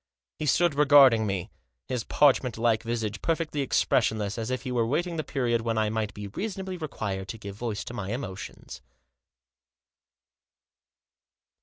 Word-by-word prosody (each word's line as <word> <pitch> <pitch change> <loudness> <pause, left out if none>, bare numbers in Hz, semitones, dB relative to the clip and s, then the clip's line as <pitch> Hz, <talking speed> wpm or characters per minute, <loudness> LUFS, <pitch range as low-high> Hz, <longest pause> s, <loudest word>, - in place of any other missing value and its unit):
He 155 - -2
stood 170 +3 +3
regarding 140 -6 +6
me, 95 -3 -3 0.4
his 125 -3 -2
parchment 135 -5 +3
like 115 -1 +2
visage 115 -3 -3
perfectly 160 -3 -1
expressionless, 110 -6 +1
as 115 +1 -3
if 130 0 -2
he 130 - -4
were 120 -1 +1
awaiting 165 +9 0
the 155 - -1
period 120 -6 0
when 115 -1 -1
I 110 -1 +1
might 110 -2 -2
be 105 - -6
reasonably 190 - -4
required 100 - -4
to 115 - -6
give 100 -2 -8
voice 110 -1 -3
to - - -8
my 100 -4 -4
emotions. 110 -6 -7
120 Hz, 150 wpm, -27 LUFS, 110-145 Hz, 0.4 s, regarding